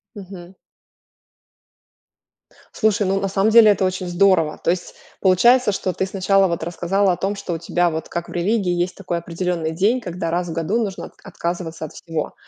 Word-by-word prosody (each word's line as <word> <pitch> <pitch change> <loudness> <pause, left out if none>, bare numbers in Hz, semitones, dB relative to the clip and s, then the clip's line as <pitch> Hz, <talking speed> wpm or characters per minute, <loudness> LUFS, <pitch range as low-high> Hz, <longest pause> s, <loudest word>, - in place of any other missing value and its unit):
Мгм. 190 -2 -11 2.2
Слушай, 210 -2 +1
ну 195 +1 +1
на 195 - -1
самом 195 +3 +1
деле 220 -2 +8
это 195 -1 +1
очень 185 0 -2
здорово! 175 -3 +2
То - - +3
есть 180 0 -5 0.3
получается, 225 +5 +4
что 190 -2 -2
ты 190 - -1
сначала 195 0 +2
вот 170 -2 -3
рассказала 180 +3 0
о - - -4
том, 195 +2 -2
что 190 -3 -5
у - - -2
тебя 175 +1 0
вот 160 -1 -5
как 170 0 -4
в - - -11
религии 185 +2 0
есть 175 +1 -1
такой 180 -3 -4
определенный 170 -1 -3
день, 205 +10 +1
когда 175 -4 -4
раз 175 +1 -1
в - - -4
1 165 +7 -1
нужно 195 -3 -5
отка - - -14
отказываться 170 -2 -4
от 155 - -11
всего. 165 -3 -5
185 Hz, 190 wpm, -21 LUFS, 170-195 Hz, 2.2 s, деле